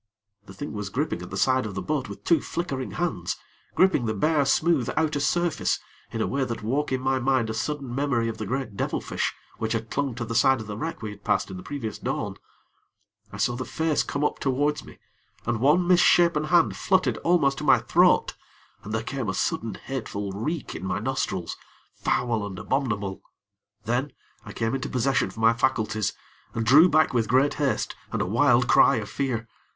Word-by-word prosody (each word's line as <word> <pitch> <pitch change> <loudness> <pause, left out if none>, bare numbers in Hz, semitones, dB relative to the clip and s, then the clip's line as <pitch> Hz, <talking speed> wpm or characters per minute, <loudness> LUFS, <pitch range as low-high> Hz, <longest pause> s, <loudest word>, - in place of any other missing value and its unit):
The - - -10
thing 145 - -6
was 105 -2 -4
gripping 140 +9 -2
at - - -8
the - - -5
side 130 -3 +2
of 100 - -7
the 95 - -2
boat 145 -6 -2
with 100 0 -9
two 170 - +3
flickering 135 -7 -4
hands 115 - -2 0.4
gripping 185 -11 +3
the 110 - -1
bare, 150 +6 +2
smooth 150 -1 +2
outer 155 -2 +1
surface, 175 +3 +1 0.3
in 115 -1 -1
a - - 0
way 135 0 -1
that 115 -3 -4
woke 135 +7 -1
in 130 - +1
my 130 0 +1
mind 130 -3 +1
a - - -3
sudden 135 +2 -3
memory 125 -4 0
of 110 -1 -4
the 110 - -4
great 125 -3 -3
devilfish - - -2 0.3
which 110 0 -1
had 115 -1 -3
clung 140 -4 -1
to 120 0 -4
the 115 - -5
side 130 +2 +4
of 110 - -6
the 105 -1 -6
wreck 160 +1 -5
we 105 - -4
had 100 0 -13
passed 100 -1 0
in 95 - -6
the - - -7
previous 115 -2 -5
dawn. - - -3 0.9
I 105 - -8
saw 115 +4 +1
the 130 - -3
face 160 +1 0
come 140 - -3
up - - 0
towards 145 +2 0
me, - - -14 0.5
and 120 -1 0
one 150 +8 +3
misshapen 170 -3 +5
hand 170 +1 +3
fluttered 190 -1 +1
almost 155 -6 +2
to - - -5
my - - +6
throat, - - +3 0.5
and 105 - -6
there 110 - -1
came 130 -3 -3
a 95 - -2
sudden, 110 -3 -1
hateful 105 -6 -5
reek 140 - -3
in - - -7
my 95 - -1
nostrils 105 -6 -2 0.4
foul 115 -4 0
and 95 -2 -8
abominable. 105 -6 -2 0.6
Then, 125 +5 -1 0.3
I - - -8
came 115 +1 -2
into 135 - -2
possession 130 +1 +1
of - - -12
my 115 +1 +4
faculties, 110 -4 0 0.4
and 115 - -1
drew 150 +10 +7
back 155 -3 +3
with 115 -3 +1
great 130 +5 +3
haste 140 -3 -1 0.2
and - - -2
a - - +1
wild - - +3
cry - - +6
of - - -3
fear. 120 -5 -2
130 Hz, 205 wpm, -25 LUFS, 110-145 Hz, 0.9 s, drew